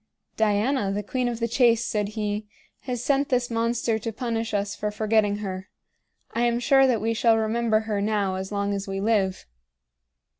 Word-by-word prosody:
"Diana, 215 +1 +1
the 205 +1 -2
queen 250 +4 -1
of 235 -1 -3
the 230 - 0
chase," 235 -1 +3
said 210 -2 -1
he, 210 0 -2 0.4
"has 245 -2 -3
sent 280 0 +1
this 245 -2 0
monster 230 -1 0
to 225 +1 -4
punish 230 -1 -3
us 205 -1 -1
for 210 - -2
forgetting 210 -1 +1
her. 190 -2 -5 0.6
I 230 - -1
am 240 0 +2
sure 270 +2 +5
that 235 -5 +1
we 225 +1 0
shall 225 0 +3
remember 220 0 +1
her 215 -2 -2
now 205 -2 0
as 190 +1 -5
long 200 0 -1
as 200 0 -4
we 195 0 -3
live." 200 -3 0
220 Hz, 185 wpm, -25 LUFS, 205-235 Hz, 0.6 s, sure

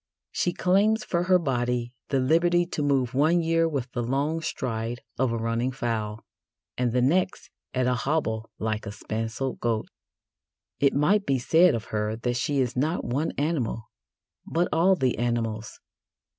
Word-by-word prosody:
She 175 - 0
claims 200 +5 +2
for 175 0 -1
her 185 0 +5
body 125 -5 -1 0.2
the 135 - +2
liberty 175 +6 +3
to 170 - -4
move 135 -4 +1
one 155 +6 +3
year 165 0 +2
with 130 -5 -3
the 120 - -2
long 140 +7 -1
stride 120 -6 -3 0.2
of 130 -2 +2
a 115 - -1
running 115 +3 -1
fowl, 110 -3 -3 0.5
and 125 -1 0
the 125 +1 +2
next 180 +8 +1 0.2
at 130 0 +2
a 125 - +2
hobble 120 -5 -1
like 110 0 -2
a - - -4
spancelled 115 +5 -4
goat. 115 -2 -1 0.9
It 140 -1 +3
might 195 +9 +3
be 135 - +2
said 165 +6 +4
of 110 - -4
her 105 0 0
that 120 +1 -2
she 140 +3 0
is 125 -3 0
not 155 +7 0
one 140 +6 -1
animal, 135 -7 -2 0.5
but 170 +2 0
all 185 +4 +4
the 130 -7 0
animals. 115 -2 -2
130 Hz, 165 wpm, -26 LUFS, 115-165 Hz, 0.9 s, her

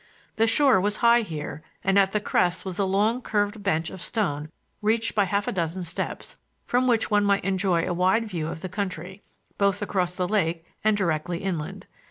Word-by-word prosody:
The 225 0 +4
shore 245 -3 +4
was 205 +2 0
high 235 +1 +6
here 155 -6 -6 0.2
and 195 +1 +4
at 195 -1 +3
the 210 - +1
crest 180 -3 0
was 185 -1 -5
a 200 - +3
long 210 +6 +1
curved 205 -1 -1
bench 165 -4 0
of 190 - -9
stone 155 -10 -2 0.3
reached 225 +2 +1
by 205 -2 +3
half 200 +2 -1
a - - +1
dozen 175 0 -2
steps, 170 0 -5 0.3
from 250 +1 +1
which 230 -2 +2
one 205 0 +4
might 200 0 +2
enjoy 190 -3 +1
a 180 - 0
wide 185 +6 +2
view 170 -6 -3
of 160 0 -6
the 185 - -4
country, 185 -1 -5 0.4
both 200 0 +2
across 185 -3 -1
the 180 -1 -1
lake 170 -5 0 0.2
and 215 -1 +3
directly 170 -1 -1
inland. 170 -6 -4
195 Hz, 200 wpm, -25 LUFS, 175-210 Hz, 0.4 s, high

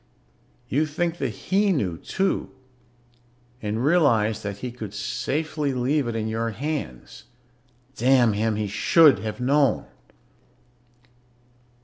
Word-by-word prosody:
You 150 +5 +1
think 170 +3 -2
that 135 - -1
he 195 - 0
knew, 100 - -1
too, 190 - -2 1.1
and 110 +4 -2
realize 115 -10 +3
that 100 -1 -5
he 125 +4 -5
could 110 -4 -8
safely 150 +4 -2
leave 130 +2 0
it 115 - -3
in 110 -1 -2
your 115 +1 -2
hands. 130 - -5 0.7
Damn 125 -3 +4
him, 110 +1 0
he 105 0 -1
should 135 - +5
have 110 +4 -5
known. 140 +2 +2
125 Hz, 115 wpm, -24 LUFS, 110-150 Hz, 1.1 s, should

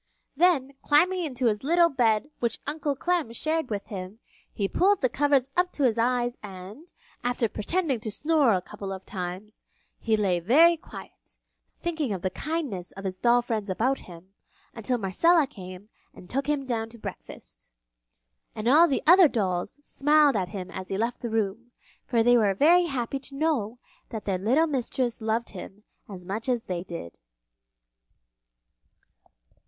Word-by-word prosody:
Then, 295 -4 +3
climbing 360 +5 +3
into 255 -4 -3
the 210 -3 +2
little 340 +4 +4
bed 245 0 +1
which 235 -2 -1
Uncle 290 -1 -2
Clem 345 -4 -1
shared 315 +3 -1
with 205 -2 -3
him, 190 0 -7 0.3
he 200 -3 -2
pulled 390 - +2
the 255 - +2
covers 275 -1 +1
up 360 0 +2
to 290 - -2
his 235 -3 +2
eyes 245 0 0
and, 205 - -10 0.3
after 245 -1 0
pretending 285 - -1
to 220 - -5
snore 295 +3 +2
a 185 -2 -1
couple 200 -1 -7
of 190 0 -7
times, 185 +2 -7 0.4
he 220 -1 +1
lay 190 -4 +1
very 310 - +5
quiet, 335 - -12 0.5
thinking 315 -9 -1
of 185 - -6
the 185 - 0
kindness 275 - -4
of 195 - -9
his 185 -1 -4
doll 240 0 +3
friends 220 -4 -3
about 245 +8 0
him, 180 +2 -14 0.4
until 240 +2 -2
Marcella 295 - +3
came 190 -5 -11 0.3
and 180 - -13
took 275 +2 -1
him 290 -2 0
down 225 -3 -2
to 235 - -13
breakfast. 215 - -10 0.8
And 215 +1 -4
all 310 +7 +7
the 275 - -1
other 355 +2 +8
dolls 195 -3 -2
smiled 295 -1 +3
at 185 -3 -1
him 190 -3 -7
as 190 -1 -7
he 195 - -3
left 230 +3 -2
the 235 - -3
room, 225 +2 -2 0.3
for 235 -3 +2
they 245 +1 +5
were 205 -4 +2
very 345 - +5
happy 270 -3 -3
to 275 0 -11
know 275 -7 -1 0.3
that 220 -3 -6
their 190 -3 -1
little 255 - +3
mistress 255 -4 -2
loved 220 +2 -1
him 195 +2 -10 0.3
as 185 -3 -8
much 215 +7 -3
as 240 -2 0
they 180 -2 -4
did. 170 - -8
235 Hz, 170 wpm, -26 LUFS, 200-290 Hz, 0.8 s, other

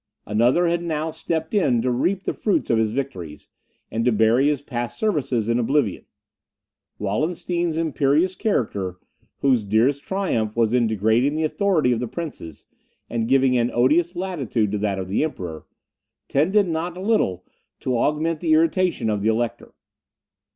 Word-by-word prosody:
Another 120 +11 +2
had 170 0 +1
now 160 -1 -2
stepped 160 +1 -3
in 140 - +3
to 125 - +1
reap 180 +10 0
the - - -2
fruits 205 - 0
of 115 - +3
his 110 -1 +2
victories, 95 - -5 0.4
and 115 +1 -1
to 125 - +3
bury 115 +5 +3
his 145 -2 0
past 120 -5 -4
services 140 - 0
in 115 +1 +1
oblivion. 120 -4 0 0.9
Wallenstein's 165 - -1
imperious 160 +2 +1
character, 100 - -1 0.4
whose 130 -5 +3
dearest 115 +8 +2
triumph 130 - -1
was 115 -1 +2
in 120 -2 +3
degrading 110 +7 +1
the 160 - 0
authority 160 -4 +1
of 120 - +1
the 125 - -3
princes, 130 - -7 0.5
and 115 -1 -1
giving 130 0 +3
an 120 0 +1
odious 160 +9 +3
latitude 140 - -1
to 105 - -1
that 100 -2 -1
of 95 -1 -4
the 100 +9 0
Emperor, 90 - -5 0.6
tended 190 +8 +2
not 170 +1 -3
a - - -6
little 185 - 0 0.4
to 130 - -1
augment 155 +6 0
the 160 -2 +1
irritation 165 -4 +2
of 105 -2 0
the 110 - +2
Elector. 115 +1 -2
135 Hz, 160 wpm, -23 LUFS, 110-165 Hz, 0.9 s, in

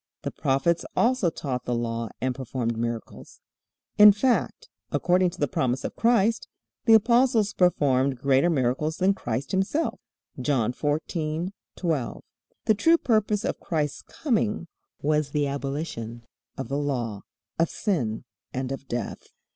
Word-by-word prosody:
The - - -3
prophets 145 +5 +1
also 240 -6 +3
taught 130 -6 -4
the 120 - -1
Law 115 -1 -2
and 130 0 0
performed 125 -2 -3
miracles. 115 0 -5 0.6
In 210 0 +11
fact, 240 +5 0 0.2
according 180 0 +3
to - - -12
the 145 - +2
promise 125 0 -1
of - - -4
Christ, 230 -1 +2 0.4
the 225 - +8
apostles 235 -1 +3
performed 140 -7 +2
greater 135 +5 +3
miracles 150 +1 0
than 190 +1 +3
Christ 120 -6 -4
Himself. 195 +12 0 0.4
(John 125 -4 +1
14:12.) 155 0 -3 0.4
The 220 - +5
true 330 +11 +4
purpose 215 -5 +1
of - - -2
Christ's 150 -5 -2
coming 215 - -1 0.4
was 150 0 +1
the 145 0 0
abolition 140 -4 -4 0.3
of - - -4
the 140 +3 -1
Law, 120 -8 -2 0.4
of 165 - +3
sin, 125 - -1 0.3
and 130 0 -3
of 135 0 -6
death. 120 -3 -4
150 Hz, 135 wpm, -26 LUFS, 130-195 Hz, 0.6 s, In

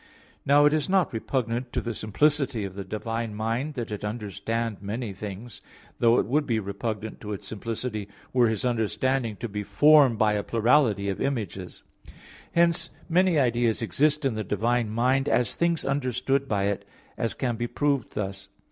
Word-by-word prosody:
Now, 145 +1 +6
it 150 - +5
is 155 +3 0
not 190 -6 +2
repugnant 120 +1 -2
to 125 - +1
the 115 -1 -3
simplicity 130 +2 +1
of 95 - -6
the 100 0 -6
divine 115 +2 -4
mind 115 +7 -2
that 120 -4 -4
it 105 - -5
understand 105 +1 -3
many 105 +1 -4
things; 105 +3 -8 0.4
though 115 0 +5
it - - +2
would 145 +7 +1
be 115 -4 +1
repugnant 105 +2 -4
to 105 -1 -5
its 100 - -7
simplicity 110 -1 -4 0.3
were 125 -2 +4
His 110 +1 -1
understanding 120 0 0
to 120 - -5
be 105 -1 -4
formed 135 +4 +5
by 110 -1 +3
a 105 - 0
plurality 115 -3 +2
of 95 - -3
images. 100 -9 -3 0.7
Hence 170 0 +3 0.2
many 180 0 +3
ideas 120 -3 +2
exist 150 - +1
in 135 - +2
the 110 0 -3
divine 115 +3 0
mind, 130 +5 +1
as 120 +2 +2
things 170 -2 0
understood 135 0 0
by 100 -4 0
it; 100 0 -1 0.3
as 115 -2 -2
can 120 -3 -1
be 120 +1 -2
proved 140 -3 -1
thus. 100 -1 -4
115 Hz, 175 wpm, -26 LUFS, 105-135 Hz, 0.7 s, Now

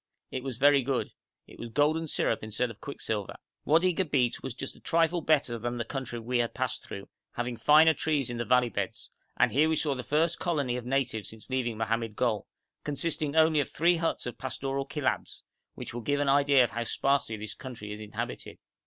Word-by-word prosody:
It 130 - -4
was 130 -4 -4
very 140 +1 +5
good; 130 0 -1 0.3
it - - -16
was 120 - -6
golden 155 +6 +2
syrup 115 - +1
instead 110 +3 -1
of 110 - -15
quicksilver. 110 -7 -3 0.3
Wadi 170 +4 +4
Gabeit 145 -9 +1
was 130 -3 -5
just 135 - -4
a - - -17
trifle 165 +1 +2
better 140 -7 +2
than 120 +1 -3
the 120 - -2
country 130 -2 -4
we 120 +2 -1
had 120 -1 -1
passed - - -2
through, - - -8 0.3
having 120 0 -3
finer 155 +6 +6
trees 150 -3 0
in 120 - -4
the 120 - -1
valley 125 +2 +3
beds; 105 - -4 0.3
and - - +4
here 155 +4 +3
we 160 - +2
saw 150 -2 +1
the 125 - -4
first 160 +5 +1
colony 145 -8 0
of 125 -1 -5
natives 125 -6 -1
since 110 +3 -10
leaving 120 -4 -1
Mohammed 115 0 -1
Gol, 115 -4 0 0.4
consisting 150 0 -1
only 160 -1 +5
of 140 - 0
three 170 +3 +3
huts 165 0 -1
of 125 - -6
pastoral 135 +1 -3
Kilabs, 145 -3 -2 0.3
which - - -7
will 120 - -4
give 145 +4 0
an 145 -1 +1
idea 140 -1 +5
of 120 - -1
how 120 - -2
sparsely 135 -2 0
this 105 0 -6
country 120 -6 -8
is 105 - -8
inhabited. 105 -1 -6
130 Hz, 205 wpm, -29 LUFS, 120-150 Hz, 0.4 s, finer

